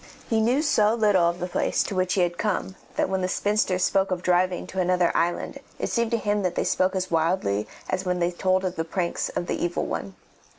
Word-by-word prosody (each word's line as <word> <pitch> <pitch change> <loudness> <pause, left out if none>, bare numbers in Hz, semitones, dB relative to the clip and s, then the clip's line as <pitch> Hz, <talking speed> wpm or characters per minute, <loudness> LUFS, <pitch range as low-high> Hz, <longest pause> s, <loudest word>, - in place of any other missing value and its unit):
He 225 -1 +2
knew 250 +7 +2
so 215 -7 +3
little 205 -6 +3
of 170 +1 -4
the 180 - -2
place 180 - 0
to - - -5
which 185 -1 0
he 190 - +2
had 175 0 0
come 205 -2 -1 0.2
that - - +1
when 190 0 -1
the 185 - 0
spinsters 195 -1 +1
spoke 195 0 +2
of 180 -1 -2
driving 180 0 +1
to 190 - -5
another 180 -1 +2
island 175 +1 -1 0.2
it - - -3
seemed 235 -1 +1
to 230 - +1
him 210 -1 0
that 180 -2 -1
they - - +1
spoke 185 +1 +1
as 185 -1 -2
wildly 160 - +1 0.2
as 185 0 -1
when 180 -1 -1
they 175 0 +1
told 185 +1 +1
of 185 0 -3
the 160 - 0
pranks 170 +1 -2
of - - -1
the - - -2
Evil 175 0 -1
One. 195 - -4
185 Hz, 240 wpm, -25 LUFS, 175-200 Hz, 0.2 s, so